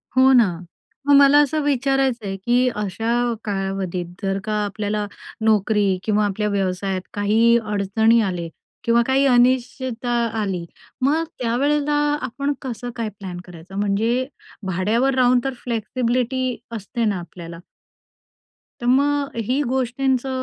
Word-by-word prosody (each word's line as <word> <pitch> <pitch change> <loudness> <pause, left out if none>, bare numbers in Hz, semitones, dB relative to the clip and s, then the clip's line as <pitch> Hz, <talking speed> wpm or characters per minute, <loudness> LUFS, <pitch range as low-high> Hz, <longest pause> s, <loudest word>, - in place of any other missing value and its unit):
हो 260 +1 +6
ना. 240 -4 +6 0.6
मग 285 - +6
मला 280 +1 +7
असं 305 +2 -1
विचारायचं 270 -4 +1
आहे 195 - -3
की 245 +1 +3
अशा 210 +2 -3 0.3
कालावधीत 195 -3 -3 0.2
जर 195 -1 -1
का 215 - -3
आपल्याला 205 +1 -2 0.4
नोकरी 210 -2 +2
किंवा 210 -1 +2
आपल्या 210 +1 -1
व्यवसायात 190 -1 -1
काही 220 +3 +3
अडचणी 215 +2 +2
आले, 180 -5 -2 0.4
किंवा 235 0 +3
काही 270 +1 +3
अनिश्चितता 250 -1 +1 0.3
आली, 185 -4 -2 0.4
मग 295 +5 +2 0.2
त्यावेळेला 285 +5 +1 0.3
आपण 280 +3 -2
कसं 245 -1 -5
काय 230 -2 -2
प्लॅन 185 -3 -6
करायचं? 180 +1 -12
म्हणजे 225 +5 0 0.4
भाड्यावर 220 +9 +1
राहून 250 -1 +4
तर 270 - -2
फ्लेक्सिबिलिटी 250 +2 -1 0.2
असते 225 +2 -3
ना 205 -4 0
आपल्याला. 170 0 -10 1.2
तर - - -4
मग 280 +2 +2
ही 265 +3 +1
गोष्टींचं 260 +1 0
230 Hz, 125 wpm, -21 LUFS, 200-260 Hz, 1.2 s, मला